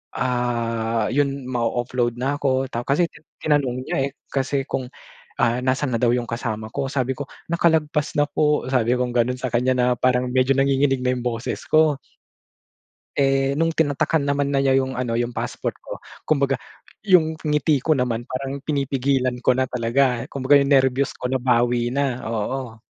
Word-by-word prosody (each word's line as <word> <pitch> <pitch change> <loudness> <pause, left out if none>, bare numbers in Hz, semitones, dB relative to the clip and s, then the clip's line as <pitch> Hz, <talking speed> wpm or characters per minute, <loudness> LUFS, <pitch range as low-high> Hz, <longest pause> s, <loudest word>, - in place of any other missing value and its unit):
ah, 115 -3 -1
yun 140 0 0
ma-ooffload 120 0 -1
na 135 +4 -2
ako. 130 -1 0
Ta 120 +1 -4
kasi 165 +5 +2
ti - - -16 0.2
tinanong 135 -4 +1
niya - - -3
eh. - - -6 0.2
Kasi 135 0 0
kung, 130 -2 -4 0.5
ah, 115 +2 +2
nasan 130 +2 0
na 115 - 0
daw 120 0 +3
yung 120 -1 -3
kasama 110 -2 -4
ko. 140 +2 -2
Sabi 130 -2 -1
ko 145 - -5 0.2
nakalagpas 160 -3 +1
na 145 - +4
po, 150 0 +1
sabi 125 -2 +2
kong 125 0 -1
ganon 125 +1 0
sa 130 - -2
kanya 125 +2 +2
na 125 -1 +2
parang 125 0 +1
medyo 130 +1 +3
nanginginig 135 -1 +2
na 125 - +2
yung 125 -1 -3
boses 115 0 -3
ko. 155 -2 +4 1.2
Eh, 135 0 +2
nung 165 +2 +1
tinatakan 155 -1 +1
naman 140 0 0
na 140 - +2
niya 135 -1 +3
yung 130 0 0
ano 125 -2 -2
yung 120 +1 -1
passport - - -3
ko, - - -7 0.3
kumbaga 140 -3 +1 0.4
yung 180 -6 +4
ngiti 150 -1 +1
ko 155 +3 +2
naman 120 -2 -2
parang 135 +2 -4
pinipigilan 135 -3 0
ko 125 0 +3
na 130 - +2
talaga. 125 0 0
Kumbaga 140 +1 +3
yung 140 - 0
nerbyos 135 -1 +2
ko - - -11
nabawi 120 -2 +1
na, 130 -1 -1
oo. 115 +2 -3
130 Hz, 175 wpm, -22 LUFS, 125-140 Hz, 1.2 s, na